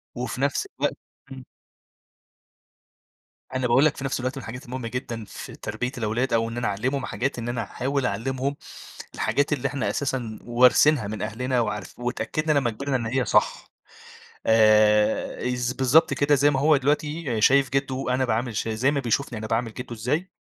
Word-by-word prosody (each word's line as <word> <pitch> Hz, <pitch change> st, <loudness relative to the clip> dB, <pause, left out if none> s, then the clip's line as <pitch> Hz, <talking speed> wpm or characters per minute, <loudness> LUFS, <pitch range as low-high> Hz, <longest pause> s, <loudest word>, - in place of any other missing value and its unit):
وفي 125 Hz, +1 st, -4 dB
نفس 145 Hz, -, 0 dB
الوقت -, -, 0 dB, 0.3 s
امم. -, -, -9 dB, 2.1 s
أنا 130 Hz, -1 st, 0 dB
باقول 130 Hz, +5 st, +4 dB
لك 155 Hz, -, +2 dB
في 135 Hz, -, -6 dB
نفس 135 Hz, -, -1 dB
الوقت 130 Hz, +2 st, -3 dB
من -, -, -5 dB
الحاجات 125 Hz, +4 st, -8 dB
المهمة 125 Hz, -2 st, -5 dB
جدًا 115 Hz, -2 st, -5 dB
في -, -, -9 dB
تربية 125 Hz, +1 st, -4 dB
الأولاد، 115 Hz, +3 st, -1 dB
أو 115 Hz, 0 st, +2 dB
إن 115 Hz, -, -6 dB
أنا 120 Hz, -, -1 dB
أعلّمهم 130 Hz, +7 st, -1 dB
حاجات، 130 Hz, 0 st, -2 dB
إن 120 Hz, +1 st, -4 dB
أنا 120 Hz, -1 st, -2 dB
أحاول 135 Hz, +5 st, -2 dB
أعلّمهم 130 Hz, +6 st, -2 dB, 0.6 s
الحاجات 145 Hz, +1 st, 0 dB
اللي 140 Hz, -4 st, 0 dB
إحنا 140 Hz, -3 st, -2 dB
أساسًا 125 Hz, -6 st, -3 dB
وارثينها 125 Hz, +1 st, +4 dB
من 105 Hz, -1 st, -5 dB
أهلنا، 125 Hz, +4 st, -1 dB
وعارف 105 Hz, -4 st, -4 dB
واتأكدنا 145 Hz, +5 st, -1 dB
لما 130 Hz, -4 st, +1 dB
كبرنا 135 Hz, +5 st, -2 dB
إن 120 Hz, -3 st, -3 dB
هي 130 Hz, +3 st, 0 dB
صح. -, -, +1 dB, 0.8 s
آآ، 110 Hz, +2 st, +3 dB
از 125 Hz, 0 st, -1 dB
بالضبط 135 Hz, +4 st, +4 dB
كده 145 Hz, +1 st, +3 dB
زي 145 Hz, +1 st, +4 dB
ما 135 Hz, -2 st, 0 dB
هو 150 Hz, +1 st, +4 dB
دلوقتي 145 Hz, -3 st, -1 dB
شايف 135 Hz, +3 st, +5 dB
جده 135 Hz, -1 st, -1 dB
أنا 130 Hz, +1 st, +1 dB
باعامل 115 Hz, 0 st, -1 dB
ش 110 Hz, -, -2 dB
زي 115 Hz, +5 st, +1 dB
ما 145 Hz, -, 0 dB
بيشوفني 125 Hz, 0 st, -1 dB
أنا 110 Hz, 0 st, -5 dB
باعامل 115 Hz, 0 st, -1 dB
جده 120 Hz, 0 st, -7 dB
إزاي، 145 Hz, -, -2 dB
125 Hz, 175 wpm, -25 LUFS, 115-140 Hz, 2.1 s, شايف